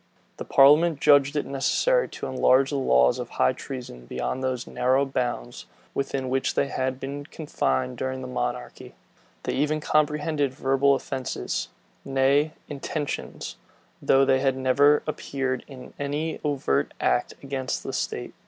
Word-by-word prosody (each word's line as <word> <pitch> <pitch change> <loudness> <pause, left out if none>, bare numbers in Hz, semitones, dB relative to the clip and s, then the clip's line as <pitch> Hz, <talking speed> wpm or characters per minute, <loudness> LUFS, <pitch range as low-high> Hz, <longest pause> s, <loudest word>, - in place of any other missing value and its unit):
The - - -6
parliament 150 +3 +5
judged 145 -1 +5
it 145 - 0
necessary - - +1
to - - -7
enlarge 130 +1 +3
the - - -1
laws 65 - +3
of - - -5
high 65 - +2
treason 120 - -8
beyond 65 - -3
those 130 -2 -2
narrow 130 +2 +1
bounds 120 - -3 0.3
within 135 -1 -2
which 130 +1 0
they 140 - +1
had 130 -1 -2
been 140 +2 -6
confined 65 - -2
during 130 0 -3
the 130 - -6
monarchy. 125 -1 -4 0.5
They - - -2
even 150 +2 0
comprehended 150 -2 0
verbal 135 +1 +3
offences, 130 -1 -3 0.4
nay, 140 +3 +2
intentions, 145 +1 -5 0.4
though 135 0 +4
they 130 -1 +3
had 135 -1 +1
never 140 +3 +4
appeared 135 -4 -3
in 130 -3 -11
any 145 +3 -2
overt 130 - 0
act 60 - +1
against 135 -1 -3
the - - -5
state. - - -3
135 Hz, 145 wpm, -25 LUFS, 130-145 Hz, 0.5 s, parliament